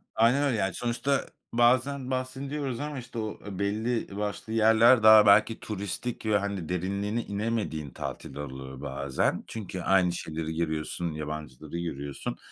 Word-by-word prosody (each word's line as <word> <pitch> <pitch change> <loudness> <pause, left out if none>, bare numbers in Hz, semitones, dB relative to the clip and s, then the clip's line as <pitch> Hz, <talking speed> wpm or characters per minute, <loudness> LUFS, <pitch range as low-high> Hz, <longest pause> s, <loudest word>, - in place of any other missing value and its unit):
Aynen 120 +5 +4
öyle, 135 -6 +1
yani, 95 -3 0
sonuçta 120 +5 0 0.3
bazen 130 +3 +2
bahsediyoruz 130 0 -3
ama, 145 -2 -4
işte, 120 -1 -7
o 110 -1 -4 0.2
belli 110 +1 -1
başlı 105 +1 -3
yerler 115 +2 +6
daha 110 -1 +9
belki 105 +2 +5
turistik 105 +3 -4
ve, 110 -1 +3
hani, 100 -5 -3
derinliğine 100 +5 -1
inemediğin 100 -8 -2
tatiller 70 - -6
oluyor 65 -1 -8
bazen. 70 -1 -1
Çünkü 95 -4 -6
aynı 90 -1 +3
şeyleri 80 -1 -4
görüyorsun, 80 +1 -2
yabancıları 75 0 -6
görüyorsun. 70 -5 -4
105 Hz, 135 wpm, -28 LUFS, 80-120 Hz, 0.3 s, daha